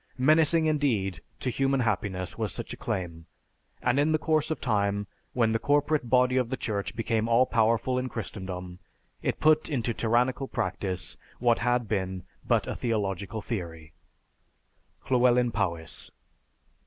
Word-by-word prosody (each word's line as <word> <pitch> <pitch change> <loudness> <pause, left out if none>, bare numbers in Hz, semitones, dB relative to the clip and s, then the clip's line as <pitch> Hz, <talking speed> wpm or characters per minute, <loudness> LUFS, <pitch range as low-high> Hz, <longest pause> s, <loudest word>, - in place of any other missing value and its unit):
Menacing 155 +4 +4
indeed 115 - 0 0.2
to 125 - -1
human 135 +1 +1
happiness 100 -5 -1
was 110 -4 -2
such - - -6
a - - -5
claim, 85 -3 -4 0.6
and 125 +2 +2
in 150 +2 +3
the - - +4
course 155 -1 +1
of 160 - -2
time 100 -3 0 0.3
when 115 -3 +2
the 115 - +1
corporate 145 -2 +1
body 125 +1 +4
of 125 -2 +1
the 130 - -2
church 100 -3 -3
became 115 -1 0
all 120 +2 +5
powerful 115 +2 +2
in 130 0 -3
Christendom, 90 -5 -6 0.4
it - - -1
put 155 0 +4
into 120 -5 -1
tyrannical 120 +4 +1
practice 95 -7 -3 0.2
what 120 -1 +2
had 120 -1 +1
been 95 -3 -2 0.2
but - - +2
a - - -4
theological 105 -2 -2
theory_. 80 -8 -5 1.2
LLEWELYN 125 -1 +4
POWYS. 85 -7 -3
115 Hz, 145 wpm, -28 LUFS, 100-130 Hz, 1.2 s, all